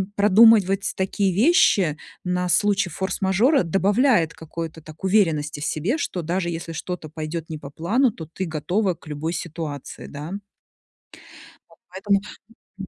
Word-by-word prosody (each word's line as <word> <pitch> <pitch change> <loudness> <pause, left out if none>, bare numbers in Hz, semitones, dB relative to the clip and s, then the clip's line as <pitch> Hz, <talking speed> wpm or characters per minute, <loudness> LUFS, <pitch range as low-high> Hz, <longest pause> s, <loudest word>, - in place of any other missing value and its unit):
продумывать 205 -1 +5
такие 190 0 0
вещи 200 - +4 0.3
на 180 0 -1
случай 205 0 +2
форс-мажора 190 - +1
добавляет 195 - +2
какой-то 160 0 -7
так 155 +2 -14
уверенности 165 -7 +1
в 145 - -3
себе, 185 - -1
что 190 - -3
даже 175 +2 -2
если 165 0 -5
что-то 165 0 -6
пойдет 155 +1 -5
не 160 - -5
по 145 -2 -9
плану, 220 - +1
то 165 -6 -9
ты 190 - -4
готова 175 +5 -1
к 165 - -19
любой 155 +2 -3
ситуации, 160 -4 -6
да. 150 +3 -7 1.4
Вот - - -22
поэтому, 195 +2 0 0.6
мгм. 195 -1 -7
180 Hz, 140 wpm, -23 LUFS, 160-200 Hz, 1.4 s, продумывать